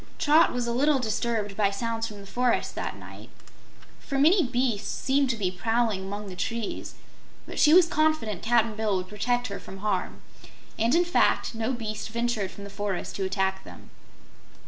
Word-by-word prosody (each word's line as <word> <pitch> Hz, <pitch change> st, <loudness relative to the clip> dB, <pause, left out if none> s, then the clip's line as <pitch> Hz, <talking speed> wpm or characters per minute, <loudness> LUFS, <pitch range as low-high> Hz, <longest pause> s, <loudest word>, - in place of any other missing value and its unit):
Trot 315 Hz, +2 st, +5 dB
was 245 Hz, -1 st, -2 dB
a 235 Hz, -, -1 dB
little 285 Hz, +4 st, +3 dB
disturbed 220 Hz, -3 st, -2 dB
by 205 Hz, -1 st, +2 dB
sounds 225 Hz, +2 st, -2 dB
from 210 Hz, -2 st, -10 dB
the -, -, -11 dB
forest, 245 Hz, +4 st, 0 dB
that -, -, -4 dB
night, -, -, -12 dB, 0.7 s
for 275 Hz, -, -4 dB
many 330 Hz, +8 st, +5 dB
beasts 245 Hz, -5 st, -1 dB
seemed 265 Hz, -3 st, +1 dB, 0.2 s
prowling 225 Hz, -1 st, +1 dB
among 200 Hz, +2 st, -5 dB
the 185 Hz, -, -8 dB
trees, 225 Hz, +4 st, -4 dB, 0.5 s
but -, -, -6 dB
she 300 Hz, -, +6 dB
was 355 Hz, +1 st, +8 dB
confident 310 Hz, -, 0 dB
Cap'n 230 Hz, -1 st, +2 dB
Bill 210 Hz, -3 st, 0 dB
would 185 Hz, 0 st, -4 dB
protect 245 Hz, +5 st, -1 dB
her 200 Hz, -, -5 dB
from 195 Hz, -, -10 dB
harm. 195 Hz, -2 st, -2 dB, 0.6 s
And 230 Hz, +6 st, +3 dB
in 350 Hz, +1 st, +4 dB
fact, 345 Hz, -, +2 dB
no 225 Hz, +2 st, -2 dB
beast 220 Hz, -4 st, -4 dB
ventured 235 Hz, -3 st, -1 dB
from 200 Hz, -, -11 dB
the 200 Hz, -, -9 dB
forest 200 Hz, -2 st, -3 dB
to 195 Hz, -, -1 dB
attack 190 Hz, 0 st, -1 dB
them. -, -, -13 dB
225 Hz, 175 wpm, -26 LUFS, 200-250 Hz, 0.7 s, was